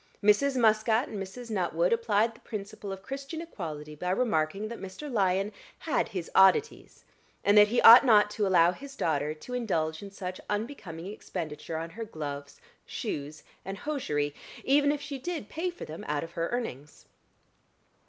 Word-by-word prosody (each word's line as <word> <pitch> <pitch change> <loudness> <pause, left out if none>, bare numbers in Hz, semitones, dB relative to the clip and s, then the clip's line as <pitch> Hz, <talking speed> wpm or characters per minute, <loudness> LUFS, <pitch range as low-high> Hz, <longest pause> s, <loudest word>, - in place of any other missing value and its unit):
Mrs. 260 +7 +4
Muscat 220 +2 +3
and 205 - -5
Mrs. 230 +5 -8
Nuttwood 175 -3 +1
applied 225 -1 +2
the 225 - -18
principle 205 -1 -7
of 190 0 -7
Christian 275 +4 -6
equality 155 - -7
by 180 +4 -4
remarking 195 -2 0
that 235 - -7
Mr. 195 +10 -7
Lyon 195 -1 +1 0.3
had 310 - 0
his 180 -4 -6
oddities, 190 -1 +3 0.4
and 205 - +4
that 210 0 +8
he 240 +3 +1
ought 235 +4 +11
not 210 -5 +5
to 210 -1 0
allow 175 -2 +5
his 275 +7 -10
daughter 150 - 0
to 200 +11 -10
indulge 160 -10 -1
in 200 - -8
such 185 -2 -6
unbecoming 205 - -4
expenditure 165 -5 -6
on 165 +1 -5
her 225 +6 -6
gloves, 145 -7 -7 0.2
shoes, 150 +1 -5 0.2
and 195 +1 -6
hosiery, 150 - -2 0.3
even 285 +1 +4
if 295 -1 -3
she 285 -1 -6
did 315 -7 -5
pay 345 +3 -2
for 350 - -8
them 155 +2 -8
out 150 0 -1
of 165 - -8
her 170 0 -2
earnings. 150 - -5
200 Hz, 170 wpm, -29 LUFS, 165-240 Hz, 0.4 s, ought